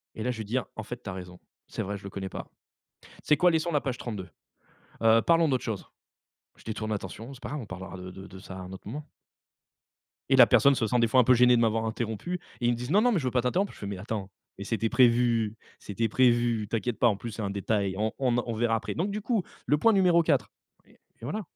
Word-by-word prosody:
et 110 Hz, -, -5 dB
là, 125 Hz, -, 0 dB
je 120 Hz, -, -6 dB
vais 110 Hz, -, -4 dB
dire: 120 Hz, +4 st, -2 dB
«En 110 Hz, -, -5 dB
fait, 120 Hz, +3 st, -7 dB
tu 100 Hz, -, -6 dB
as -, -, -4 dB
raison, 90 Hz, -1 st, -9 dB, 0.3 s
c'est -, -, -5 dB
vrai, 100 Hz, +1 st, -4 dB
je 95 Hz, -, -15 dB
le 100 Hz, -, -6 dB
connais 95 Hz, 0 st, -5 dB
pas. -, -, -7 dB, 0.5 s
Tu -, -, -18 dB
sais 150 Hz, -, +3 dB
quoi, 180 Hz, -1 st, +4 dB
laissons 165 Hz, +1 st, 0 dB
la 145 Hz, -, +1 dB
page 125 Hz, -2 st, -3 dB
32. 105 Hz, -7 st, -6 dB, 0.7 s
Heu, 115 Hz, 0 st, +5 dB
parlons 165 Hz, -1 st, +4 dB
d'autre 130 Hz, -2 st, 0 dB
chose». 110 Hz, -4 st, -4 dB, 0.7 s
Je -, -, -18 dB
détourne 110 Hz, 0 st, -4 dB
l'attention: 110 Hz, +5 st, -5 dB
«C'est 130 Hz, -, -14 dB
pas -, -, -6 dB
grave, 150 Hz, -2 st, -4 dB
on -, -, -8 dB
parlera 95 Hz, 0 st, -8 dB
de 90 Hz, 0 st, -8 dB
de 95 Hz, 0 st, -11 dB
ça 95 Hz, -1 st, -10 dB
à -, -, -7 dB
un 90 Hz, 0 st, -9 dB
autre 95 Hz, -, -10 dB
moment» 145 Hz, +6 st, -6 dB, 1.2 s
et -, -, +5 dB
la -, -, +8 dB
personne 140 Hz, 0 st, +5 dB
se 115 Hz, -3 st, 0 dB
sent 120 Hz, +3 st, +1 dB
des 115 Hz, -, +4 dB
fois 130 Hz, +3 st, +4 dB
un -, -, +7 dB
peu 130 Hz, -, +5 dB
gênée 125 Hz, 0 st, +6 dB
de 115 Hz, -, +2 dB
m'avoir 115 Hz, 0 st, +1 dB
interrompu. 110 Hz, -, -3 dB, 0.2 s
Ils 120 Hz, 0 st, +3 dB
me -, -, 0 dB
disent: 125 Hz, +5 st, -5 dB
«Non 210 Hz, -, +5 dB
non, 245 Hz, +1 st, +3 dB
mais 190 Hz, -, +2 dB
je 135 Hz, -, -4 dB
veux 125 Hz, -, 0 dB
pas 125 Hz, -, +2 dB
t'interrompre». 185 Hz, +11 st, 0 dB
Je -, -, -16 dB
fais: 100 Hz, -, -5 dB
«Mais 100 Hz, -2 st, -4 dB
attends, 100 Hz, 0 st, -5 dB, 0.3 s
mais 100 Hz, -, -6 dB
c'était 115 Hz, +1 st, -1 dB
prévu 115 Hz, -3 st, +3 dB, 0.2 s
c'était 105 Hz, +3 st, -2 dB
prévu. 120 Hz, -2 st, +2 dB
T'inquiète 115 Hz, +1 st, -2 dB
pas, 120 Hz, -, +5 dB
en 105 Hz, -4 st, +2 dB
plus 115 Hz, +1 st, -6 dB
c'est 110 Hz, -, -6 dB
un 100 Hz, -, -2 dB
détail, 100 Hz, -1 st, -1 dB
on 110 Hz, +1 st, 0 dB, 0.3 s
en 120 Hz, -, +1 dB
on 115 Hz, -, -3 dB
verra 115 Hz, 0 st, +1 dB
après, 110 Hz, -, -3 dB
donc 190 Hz, +5 st, -1 dB
du 210 Hz, +1 st, -3 dB
coup, 215 Hz, -4 st, 0 dB, 0.2 s
le 150 Hz, -, +3 dB
point 230 Hz, -, +4 dB
numéro 180 Hz, -3 st, +4 dB
4» 135 Hz, -10 st, +1 dB, 0.4 s
et -, -, -24 dB, 0.2 s
voilà. 205 Hz, -, -3 dB
115 Hz, 265 wpm, -28 LUFS, 105-130 Hz, 1.2 s, la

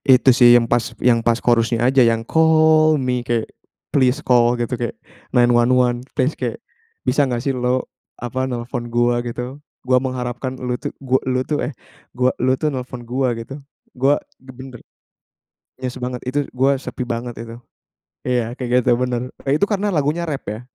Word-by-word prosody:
itu 130 Hz, +1 st, +3 dB
sih, 120 Hz, -2 st, +7 dB
yang 115 Hz, -, -2 dB
pas 120 Hz, 0 st, 0 dB
yang 115 Hz, -2 st, +3 dB
pas 115 Hz, 0 st, +2 dB
chorus-nya 115 Hz, 0 st, +2 dB
aja 130 Hz, 0 st, +5 dB
yang 115 Hz, 0 st, +1 dB
call 155 Hz, -1 st, +4 dB
me, 125 Hz, -2 st, -1 dB
kayak 120 Hz, -2 st, -1 dB, 0.4 s
please 130 Hz, 0 st, +2 dB
call 120 Hz, -4 st, +3 dB
gitu, 120 Hz, +1 st, -1 dB
kayak 120 Hz, -1 st, -5 dB, 0.3 s
911 120 Hz, 0 st, +3 dB
please 135 Hz, +2 st, 0 dB
kayak, 120 Hz, -3 st, -4 dB, 0.5 s
"Bisa 130 Hz, +3 st, +3 dB
nggak 125 Hz, -3 st, -1 dB
sih 135 Hz, +2 st, -2 dB
lo," 125 Hz, +1 st, 0 dB, 0.3 s
apa, 125 Hz, +2 st, -3 dB
"nelpon 120 Hz, 0 st, -5 dB
gua" 120 Hz, 0 st, +1 dB
gitu. 125 Hz, +4 st, -6 dB, 0.2 s
"Gua 130 Hz, 0 st, +3 dB
mengharapkan 130 Hz, 0 st, -4 dB
lo 125 Hz, -1 st, -2 dB
tuh, 145 Hz, +3 st, -5 dB
gu 130 Hz, -1 st, -1 dB
e -, -, -10 dB
lo 130 Hz, -, +1 dB
tuh," 150 Hz, -, -1 dB
eh, -, -, -15 dB, 0.4 s
"gua 125 Hz, +1 st, +1 dB
lo 130 Hz, 0 st, +2 dB
tuh 155 Hz, -, 0 dB
nelpon 125 Hz, -3 st, -5 dB
gua," 130 Hz, +1 st, 0 dB
gitu. 115 Hz, +4 st, -8 dB, 0.4 s
"Gua 135 Hz, +3 st, +2 dB, 0.2 s
ge 130 Hz, -, -11 dB
benar" 130 Hz, -1 st, -11 dB, 1.0 s
Yes 130 Hz, 0 st, -4 dB
banget. 125 Hz, 0 st, -4 dB
Itu, 145 Hz, +2 st, 0 dB
"gue 135 Hz, +2 st, +2 dB
sepi 130 Hz, -, -6 dB
banget 120 Hz, 0 st, -4 dB
itu." 115 Hz, 0 st, -8 dB, 0.6 s
iya, 120 Hz, -2 st, -1 dB
kayak 125 Hz, -1 st, 0 dB
gitu -, -, +4 dB
benar. 125 Hz, 0 st, -2 dB, 0.2 s
E 140 Hz, -, +3 dB
itu 180 Hz, -, +3 dB
karena 205 Hz, 0 st, -1 dB
lagunya 165 Hz, -1 st, 0 dB
rap 140 Hz, -3 st, -4 dB
ya. 105 Hz, +2 st, -5 dB
125 Hz, 180 wpm, -20 LUFS, 120-135 Hz, 1.0 s, sih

